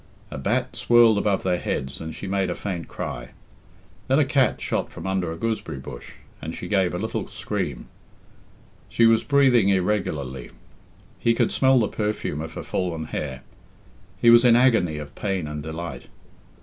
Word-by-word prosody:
A -, -, -5 dB
bat 70 Hz, -, -1 dB
swirled 120 Hz, -3 st, +5 dB
above 100 Hz, -2 st, 0 dB
their 90 Hz, -2 st, +1 dB
heads 65 Hz, +1 st, -3 dB
and 80 Hz, 0 st, -6 dB
she -, -, -7 dB
made 95 Hz, -1 st, 0 dB
a 90 Hz, -, -2 dB
faint 90 Hz, -5 st, -5 dB
cry. -, -, -6 dB, 0.7 s
Then 135 Hz, -, +3 dB
a 155 Hz, -, +4 dB
cat 130 Hz, -4 st, +2 dB
shot -, -, -2 dB
from -, -, -9 dB
under 95 Hz, -3 st, -1 dB
a -, -, -4 dB
gooseberry 105 Hz, -6 st, -3 dB
bush, -, -, -9 dB, 0.3 s
and 80 Hz, +3 st, -5 dB
she -, -, -6 dB
gave 95 Hz, -4 st, +1 dB
a -, -, -1 dB
little 110 Hz, +4 st, -3 dB
scream. -, -, -4 dB, 1.0 s
She 115 Hz, -, +3 dB
was 115 Hz, 0 st, +4 dB
breathing 130 Hz, -8 st, +4 dB
irregularly. 90 Hz, -10 st, -1 dB, 0.7 s
He 115 Hz, 0 st, +2 dB
could -, -, +1 dB
smell 130 Hz, -1 st, +4 dB
the 110 Hz, -, +2 dB
perfume 105 Hz, -9 st, -3 dB
of 80 Hz, 0 st, -7 dB
her -, -, -5 dB
fallen 85 Hz, -4 st, -2 dB
hair. 65 Hz, -3 st, -4 dB, 0.8 s
He 120 Hz, -, +6 dB
was 120 Hz, +1 st, +7 dB
in 120 Hz, -2 st, +6 dB
agony 115 Hz, -11 st, +3 dB
of 75 Hz, -1 st, -8 dB
pain 95 Hz, -5 st, -2 dB
and 75 Hz, 0 st, -5 dB
delight. 80 Hz, -4 st, -6 dB
95 Hz, 175 wpm, -24 LUFS, 80-115 Hz, 1.0 s, was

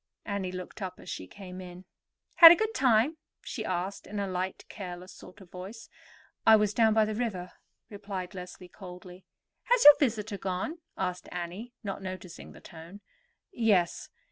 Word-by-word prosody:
Annie 200 Hz, -3 st, -3 dB
looked 185 Hz, +3 st, -8 dB
up 185 Hz, -1 st, -5 dB
as -, -, -9 dB
she 95 Hz, -, -6 dB
came 185 Hz, -, -10 dB
in. 180 Hz, 0 st, -11 dB, 0.5 s
"Had 330 Hz, -2 st, +13 dB
a -, -, +8 dB
good 440 Hz, +5 st, -1 dB
time?" 260 Hz, -, +3 dB, 0.3 s
she 220 Hz, -, -5 dB
asked 185 Hz, 0 st, -3 dB
in 205 Hz, 0 st, -5 dB
a 200 Hz, -, -1 dB
light, 185 Hz, 0 st, -4 dB
careless 180 Hz, -2 st, -8 dB
sort 190 Hz, +3 st, -14 dB
of 180 Hz, -, -16 dB
voice. 195 Hz, +5 st, -9 dB, 0.5 s
"I 220 Hz, -, +8 dB
was 210 Hz, -1 st, +2 dB
down 220 Hz, -1 st, +3 dB
by 220 Hz, -1 st, +5 dB
the 215 Hz, -, -3 dB
river," 210 Hz, -6 st, -3 dB, 0.4 s
replied 200 Hz, -2 st, -6 dB
Leslie 180 Hz, 0 st, -9 dB
coldly. 180 Hz, 0 st, -12 dB, 0.4 s
"Has -, -, +3 dB
your 295 Hz, -1 st, +11 dB
visitor 215 Hz, -6 st, -1 dB
gone?" 190 Hz, -, -3 dB, 0.2 s
asked 180 Hz, -1 st, -3 dB
Annie, 180 Hz, +8 st, -6 dB
not 200 Hz, -1 st, -5 dB
noticing 185 Hz, -2 st, -8 dB
the -, -, -15 dB
tone. 170 Hz, +4 st, -12 dB, 0.5 s
"Yes. 205 Hz, -7 st, +1 dB
195 Hz, 170 wpm, -29 LUFS, 180-220 Hz, 0.5 s, Had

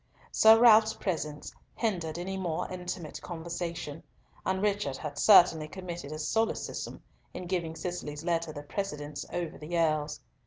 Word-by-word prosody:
Sir 220 Hz, +1 st, +7 dB
Ralf's 220 Hz, -2 st, +7 dB
presence 150 Hz, -5 st, -3 dB, 0.2 s
hindered 175 Hz, -8 st, -1 dB
any 185 Hz, +2 st, -4 dB
more 175 Hz, -4 st, -2 dB
intimate 180 Hz, -3 st, -5 dB
conversation, 170 Hz, -2 st, -5 dB, 0.4 s
and 190 Hz, -, 0 dB
Richard 200 Hz, -9 st, 0 dB
had 145 Hz, -2 st, -6 dB
certainly 170 Hz, -6 st, +6 dB
committed 175 Hz, -3 st, -7 dB
a 155 Hz, -, -4 dB
solecism 220 Hz, +8 st, -2 dB, 0.3 s
in 180 Hz, -, -5 dB
giving 170 Hz, -3 st, -2 dB
Cicely's 160 Hz, -4 st, -5 dB
letter 170 Hz, -2 st, 0 dB
the 145 Hz, -1 st, -8 dB
precedence 150 Hz, -4 st, -4 dB
over 175 Hz, -2 st, -4 dB
the 165 Hz, +3 st, -3 dB
Earl's. 155 Hz, -2 st, +1 dB
170 Hz, 140 wpm, -30 LUFS, 155-190 Hz, 0.4 s, Sir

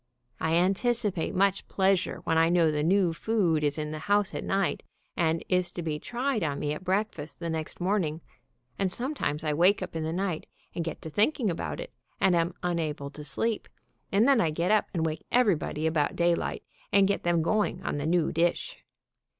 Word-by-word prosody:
I 160 Hz, +1 st, +1 dB
anticipate 195 Hz, +1 st, +1 dB
much 195 Hz, +1 st, +2 dB
pleasure 190 Hz, -1 st, +1 dB
when 165 Hz, -, +1 dB
I 165 Hz, 0 st, +4 dB
know 170 Hz, -2 st, +4 dB
the 150 Hz, -1 st, -1 dB
new 180 Hz, +1 st, +3 dB
food 175 Hz, -5 st, +1 dB
is 145 Hz, +1 st, +1 dB
in 150 Hz, -1 st, -3 dB
the 155 Hz, -, -5 dB
house 205 Hz, +4 st, +1 dB
at -, -, -4 dB
night, 195 Hz, -1 st, 0 dB, 0.3 s
and 165 Hz, -1 st, 0 dB
is 180 Hz, -1 st, +1 dB
to 175 Hz, -, -5 dB
be 155 Hz, -2 st, -2 dB
tried 250 Hz, -, -2 dB
on 145 Hz, -3 st, -1 dB
me 150 Hz, 0 st, -1 dB
at 150 Hz, -, -7 dB
breakfast 185 Hz, -5 st, -2 dB
the 170 Hz, -1 st, -3 dB
next 160 Hz, -1 st, -4 dB
morning, 175 Hz, -4 st, 0 dB, 0.6 s
and 190 Hz, -2 st, +1 dB
sometimes 240 Hz, -, -2 dB
I 155 Hz, -1 st, 0 dB
wake 185 Hz, +6 st, +4 dB
up 180 Hz, -, -8 dB
in 160 Hz, -, -1 dB
the 160 Hz, 0 st, -2 dB
night 180 Hz, -2 st, -2 dB, 0.3 s
and 170 Hz, -, -2 dB
get 165 Hz, -1 st, -6 dB
to 160 Hz, -, -6 dB
thinking 220 Hz, -, +2 dB
about 165 Hz, -, -4 dB
it, -, -, -7 dB, 0.3 s
and 185 Hz, -2 st, +4 dB
am 170 Hz, +1 st, +1 dB
unable 155 Hz, -5 st, -2 dB
to 150 Hz, -, -9 dB
sleep, 210 Hz, +10 st, -2 dB, 0.4 s
and 210 Hz, +5 st, +4 dB
then 270 Hz, -5 st, +5 dB
I 165 Hz, -, +2 dB
get 170 Hz, +5 st, 0 dB
up 215 Hz, -1 st, +3 dB
and 165 Hz, -3 st, -1 dB
wake 155 Hz, -1 st, -3 dB
everybody 190 Hz, -10 st, +2 dB
about 155 Hz, -2 st, +1 dB
day 170 Hz, 0 st, +3 dB
light, -, -, -3 dB, 0.3 s
and 195 Hz, -1 st, +5 dB
get 200 Hz, -, 0 dB
them 170 Hz, -2 st, +1 dB
going 210 Hz, +5 st, 0 dB
on -, -, -2 dB
the 145 Hz, -, -2 dB
new 170 Hz, -1 st, +2 dB
dish. 170 Hz, +1 st, -1 dB
175 Hz, 205 wpm, -28 LUFS, 160-200 Hz, 0.6 s, then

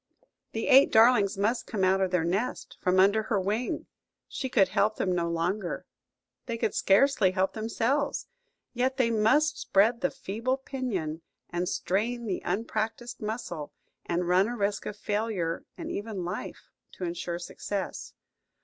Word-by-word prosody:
The 225 Hz, -, -2 dB
eight 275 Hz, 0 st, +7 dB
darlings 220 Hz, -4 st, +5 dB
must 215 Hz, +5 st, 0 dB
come 205 Hz, -4 st, -2 dB
out 190 Hz, +1 st, +3 dB
of 190 Hz, -, +2 dB
their 180 Hz, -2 st, +1 dB
nest, 195 Hz, +9 st, -2 dB
from 185 Hz, 0 st, +3 dB
under 200 Hz, +3 st, +5 dB
her 215 Hz, -2 st, 0 dB
wing; 210 Hz, +6 st, -2 dB, 0.4 s
she 260 Hz, -, -4 dB
could 200 Hz, -7 st, +4 dB
help 210 Hz, +1 st, +2 dB
them 185 Hz, -, 0 dB
no 170 Hz, -1 st, 0 dB
longer–they 180 Hz, +6 st, -5 dB
could 215 Hz, -, 0 dB
scarcely 205 Hz, 0 st, +4 dB
help 185 Hz, +1 st, 0 dB
themselves. 230 Hz, +6 st, -1 dB, 0.5 s
Yet 260 Hz, +2 st, 0 dB
they 240 Hz, -3 st, +2 dB
must 275 Hz, +7 st, +3 dB
spread 230 Hz, -1 st, +3 dB
the 275 Hz, -, +2 dB
feeble 230 Hz, +6 st, -2 dB
pinion, 215 Hz, -, -3 dB, 0.3 s
and 175 Hz, +1 st, -1 dB
strain 235 Hz, +6 st, -1 dB
the 195 Hz, -4 st, -2 dB
unpractised 225 Hz, +4 st, -3 dB
muscle, 210 Hz, -9 st, -4 dB, 0.3 s
and 175 Hz, +1 st, -1 dB
run 185 Hz, +3 st, +4 dB
a 240 Hz, +1 st, -4 dB
risk 205 Hz, -1 st, -1 dB
of 210 Hz, -, -5 dB
failure 205 Hz, -6 st, -2 dB
and -, -, -5 dB
even 205 Hz, -4 st, -4 dB
life, 175 Hz, -, -6 dB, 0.2 s
to -, -, -8 dB
insure 170 Hz, 0 st, -3 dB
success. 190 Hz, +2 st, -5 dB
210 Hz, 150 wpm, -28 LUFS, 185-235 Hz, 0.5 s, eight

